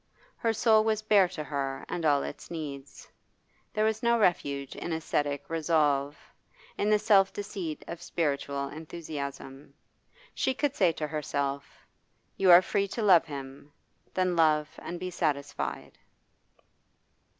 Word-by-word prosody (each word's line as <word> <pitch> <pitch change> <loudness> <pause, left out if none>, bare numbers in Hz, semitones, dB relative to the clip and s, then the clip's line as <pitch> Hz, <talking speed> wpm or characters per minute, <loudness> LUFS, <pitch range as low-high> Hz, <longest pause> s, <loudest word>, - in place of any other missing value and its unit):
Her 230 - 0
soul 220 0 +4
was 215 -1 0
bare 205 -3 +5
to 155 - -5
her 135 -2 -3
and 170 - -4
all 145 -2 +3
its - - -8
needs. 145 -4 -7 0.6
There 215 -1 +1
was 220 0 0
no 235 0 +3
refuge 140 - 0
in 175 - -5
ascetic 145 -3 -2
resolve, 150 -3 +1 0.6
in 205 - 0
the 215 - +5
self 205 -2 +4
deceit 190 -6 -5
of 170 0 -7
spiritual 140 -4 -2
enthusiasm. 145 -3 -7 0.6
She 265 - 0
could 290 0 -1
say 180 -4 +4
to 155 - -3
herself: 140 -2 -4 0.5
You 190 -1 +2
are 175 +1 +9
free 200 +2 0
to 225 +3 -4
love 180 -5 +6
him; 140 -1 -9 0.4
then 185 -1 +1
love 155 -2 +3
and 175 - -6
be 185 0 -4
satisfied. 140 - -3
160 Hz, 140 wpm, -29 LUFS, 140-195 Hz, 0.6 s, are